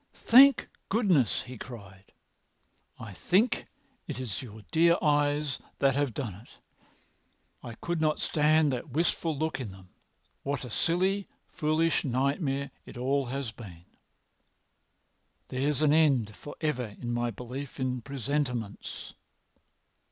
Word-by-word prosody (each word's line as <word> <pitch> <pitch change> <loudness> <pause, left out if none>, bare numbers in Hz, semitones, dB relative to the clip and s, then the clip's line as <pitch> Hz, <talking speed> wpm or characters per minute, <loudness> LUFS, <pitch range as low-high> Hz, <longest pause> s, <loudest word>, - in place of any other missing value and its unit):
"Thank 270 +3 +7 0.2
goodness!" 185 - +2
he 125 -2 -10
cried. 100 -5 -11 0.9
"I 110 -3 -8
think 200 - +1 0.4
it - - -4
is 110 -8 -4
your 110 -3 -10
dear 170 +1 +5
eyes 145 -2 +1 0.2
that 135 -1 +3
have 140 -4 0
done 120 -8 -3
it. 105 +6 -15 1.0
I 120 -2 -8
could 170 +4 -3
not 155 -1 +2
stand 155 0 +3
that 130 +5 -4
wistful 160 +2 0
look 155 -1 -1
in 125 -5 -4
them. 95 -1 -14 0.5
What 140 -1 -3
a 125 - -9
silly, 185 - +1 0.2
foolish 155 +1 +1
nightmare 140 +1 0
it - - -11
all 135 +2 0
has 135 -2 -3
been! 90 -8 -12 1.6
There's 140 +3 0
an 150 -1 +5
end 135 -10 +3
for 145 - -10
ever 125 -9 -2
in 120 -1 -4
my 120 0 0
belief 125 +6 -7
in 125 -1 -1
presentiments. 130 -4 -3
135 Hz, 130 wpm, -29 LUFS, 120-155 Hz, 1.6 s, Thank